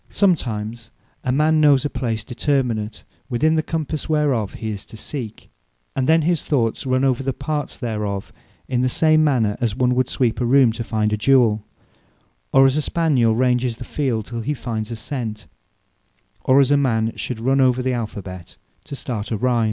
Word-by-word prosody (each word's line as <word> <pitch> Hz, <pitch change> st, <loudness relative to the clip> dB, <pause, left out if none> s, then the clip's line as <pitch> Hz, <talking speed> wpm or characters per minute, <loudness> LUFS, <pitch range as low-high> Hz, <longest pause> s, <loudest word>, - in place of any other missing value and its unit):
Sometimes 115 Hz, -, 0 dB, 0.3 s
a 125 Hz, -, 0 dB
man 155 Hz, +3 st, +3 dB
knows 145 Hz, -3 st, +5 dB
a -, -, 0 dB
place 115 Hz, -3 st, -2 dB
determinate, 120 Hz, -5 st, -1 dB, 0.3 s
within 155 Hz, +6 st, +2 dB
the 160 Hz, -, +2 dB
compasse 155 Hz, -1 st, -4 dB
whereof 140 Hz, -9 st, +1 dB
his 110 Hz, -3 st, -4 dB
is -, -, -11 dB
to 110 Hz, -, -12 dB
seek; 115 Hz, -2 st, -6 dB, 0.4 s
and 130 Hz, -1 st, 0 dB
then 160 Hz, 0 st, +5 dB
his 170 Hz, 0 st, 0 dB
thoughts 125 Hz, -3 st, 0 dB
run 130 Hz, +1 st, +1 dB
over 130 Hz, -2 st, +2 dB
all -, -, -8 dB
the 135 Hz, -, 0 dB
parts 145 Hz, +2 st, -4 dB
thereof, 105 Hz, -5 st, -4 dB, 0.3 s
in 125 Hz, -1 st, 0 dB
the 130 Hz, -, +2 dB
same 155 Hz, +3 st, +3 dB
manner, 120 Hz, -9 st, +1 dB
as 115 Hz, -4 st, 0 dB
one 125 Hz, -1 st, +2 dB
would 130 Hz, 0 st, +1 dB
sweep 125 Hz, -2 st, 0 dB
a -, -, +1 dB
room, 130 Hz, -2 st, +5 dB
to 115 Hz, +1 st, -5 dB
find 110 Hz, -2 st, 0 dB
a -, -, +1 dB
jewell; 110 Hz, -3 st, +3 dB, 0.9 s
or 135 Hz, 0 st, +6 dB
as 135 Hz, +2 st, +3 dB
a -, -, +2 dB
Spaniel 140 Hz, -9 st, +2 dB
ranges 125 Hz, -1 st, +1 dB
the 125 Hz, -, -7 dB
field, 125 Hz, -5 st, -2 dB
till 115 Hz, 0 st, -5 dB
he 150 Hz, +6 st, -2 dB
find 110 Hz, -4 st, -4 dB
a 115 Hz, -, -4 dB
sent; 110 Hz, -3 st, -5 dB, 1.0 s
or 130 Hz, +1 st, +5 dB
as 140 Hz, 0 st, +4 dB
a 145 Hz, -, +5 dB
man 115 Hz, -5 st, +1 dB
should 125 Hz, -3 st, -4 dB
run 135 Hz, +4 st, +2 dB
over 130 Hz, -1 st, +3 dB
the 130 Hz, 0 st, 0 dB
alphabet, 100 Hz, -6 st, -6 dB, 0.3 s
to 140 Hz, -, -7 dB
start 115 Hz, -5 st, -4 dB
a 110 Hz, -, -1 dB
rime. 125 Hz, +1 st, +1 dB
125 Hz, 195 wpm, -21 LUFS, 110-140 Hz, 1.0 s, or